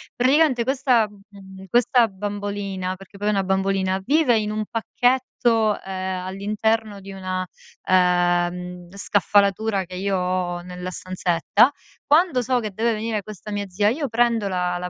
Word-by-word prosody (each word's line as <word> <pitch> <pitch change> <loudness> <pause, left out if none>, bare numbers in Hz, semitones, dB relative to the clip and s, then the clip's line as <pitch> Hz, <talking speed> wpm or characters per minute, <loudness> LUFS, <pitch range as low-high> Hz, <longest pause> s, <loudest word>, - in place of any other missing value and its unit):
Praticamente 260 0 +3
questa 255 -3 +2
mhmm, 195 -2 -14
questa 240 +2 +4
bambolina, 200 -2 -4
perché 195 +1 -15
poi 205 - -3
è 210 - +3
una 195 -2 +1
bambolina, 190 0 0
vive 280 -4 +3
in 210 0 -2
un 215 0 -2
pacchetto, 230 -2 +1
ehm, 185 -1 -4
all'interno 210 +2 -1
di 195 0 -10
una, 185 -1 -3 0.4
ehm, 180 -1 +1
scaffalatura 200 0 +1
che 180 +1 -9
io 195 0 -1
ho 180 -1 -1
nella 180 0 -7
stanzetta, 185 - +1 0.3
quando 305 -3 +3
so 250 +1 +1
che 215 - -3
deve 225 +3 0
venire 215 -1 -2
questa 215 0 -10
mia 205 0 -2
zia, 205 +3 +1
io 280 +4 -2
prendo 230 -2 +1
la 180 -2 -1
la 180 0 -5
200 Hz, 150 wpm, -22 LUFS, 185-225 Hz, 0.4 s, questa